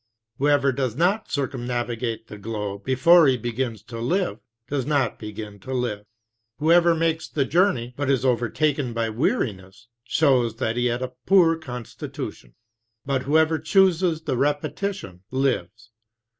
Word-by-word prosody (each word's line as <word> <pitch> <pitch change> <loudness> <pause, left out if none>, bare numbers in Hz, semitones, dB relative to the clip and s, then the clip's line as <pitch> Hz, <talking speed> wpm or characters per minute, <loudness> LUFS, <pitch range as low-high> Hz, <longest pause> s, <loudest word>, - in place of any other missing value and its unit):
Whoever 140 0 +3
does 130 -3 -2
not 190 - +1
circumnavigate 120 -4 -3
the 105 - -11
globe 105 -1 -5
before 160 +5 +5
he 130 -2 +3
begins 120 -2 -3
to 115 -1 -8
live, 160 - -1 0.3
does 140 -1 -1
not 145 -3 0
begin 105 -1 -8
to 130 +6 -5
live. 105 -5 -2 0.5
Whoever 170 +2 +4
makes 160 0 0
the 140 -3 0
journey, 155 -8 +1
but 145 0 -2
is 135 -2 +2
overtaken 130 +2 0
by 115 -1 -1
weariness, 110 - -2
shows 125 -4 +2
that 115 -2 -2
he 120 0 +1
had 120 +1 -1
a 130 0 -5
poor 175 -4 +5
constitution. 125 - -8 0.5
But 135 -1 0
whoever 160 +2 +3
chooses 180 -4 +2
the 140 -6 -1
repetition, 145 - -2
lives. 115 -4 -2
130 Hz, 140 wpm, -24 LUFS, 115-155 Hz, 0.5 s, before